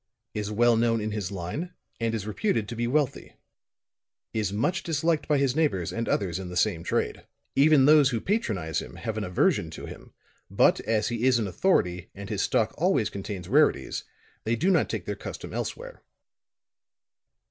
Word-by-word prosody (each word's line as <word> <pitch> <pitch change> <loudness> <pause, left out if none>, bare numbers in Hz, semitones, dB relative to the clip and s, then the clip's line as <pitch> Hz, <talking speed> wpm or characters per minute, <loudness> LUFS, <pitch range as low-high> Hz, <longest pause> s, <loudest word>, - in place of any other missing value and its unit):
"Is 105 -1 -3
well 120 +2 +4
known 115 0 +2
in 110 0 -3
his 105 -3 -3
line 120 - -5 0.2
and 115 -1 0
is 105 -3 -4
reputed 110 - -1
to 120 - -6
be 120 +1 -1
wealthy. 140 +1 -1 1.0
Is 105 -4 -1
much 115 - 0
disliked 160 -1 0
by 150 - +3
his 135 -2 +1
neighbors 140 - 0
and 115 0 -2
others 95 -3 0
in 95 -2 -6
the 90 - -5
same 90 -4 +1
trade. - - -2 0.3
Even 145 -1 +6
those 150 -2 +6
who 120 -4 -1
patronize 110 - -1
him - - -10
have 110 - -4
an 110 - -2
aversion 90 -2 +1
to - - -8
him; - - -11 0.4
but - - +4
as 110 -1 0
he 120 0 -1
is 130 -2 +4
an 115 - 0
authority, 90 - +1
and 100 +2 -8
his 105 - -1
stock - - +1
always - - +2
contains 95 -2 -6
rarities, - - +2 0.4
they 115 +2 +1
do 180 +11 +2
not 180 - +2
take - - -4
their - - -3
custom - - -8
elsewhere. - - -5
115 Hz, 180 wpm, -27 LUFS, 100-145 Hz, 1.0 s, Even